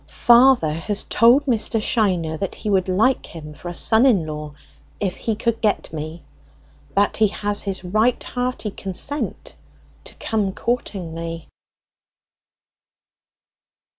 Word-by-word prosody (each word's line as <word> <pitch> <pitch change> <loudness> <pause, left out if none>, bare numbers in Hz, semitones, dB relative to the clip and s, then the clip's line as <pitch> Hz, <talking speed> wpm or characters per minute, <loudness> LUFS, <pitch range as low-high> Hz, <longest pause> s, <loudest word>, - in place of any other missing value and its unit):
Father 240 - +4
has 200 +6 -3
told 245 +6 +4
Mr. 225 -3 +2
Shiner 185 -8 +1
that 195 +3 -4
he 210 - -4
would 190 -1 +1
like 220 +8 +1
him 150 -2 -10
for 175 +4 -8
a 175 - -7
son 220 +6 +4
in 200 -11 +3
law, 150 -1 -6 0.5
if 190 -3 -2
he 225 - -2
could 230 +1 -2
get 210 -6 -1
me; 155 +2 -6 0.7
that 200 +1 +2
he 220 - +4
has 205 0 -2
his 195 -2 -4
right 215 +7 +1
hearty 250 -3 -3
consent 195 +11 -3 0.5
to - - -10
come 210 -4 -2
courting 200 -8 -3
me!" 165 0 -6
205 Hz, 135 wpm, -21 LUFS, 170-230 Hz, 0.7 s, Father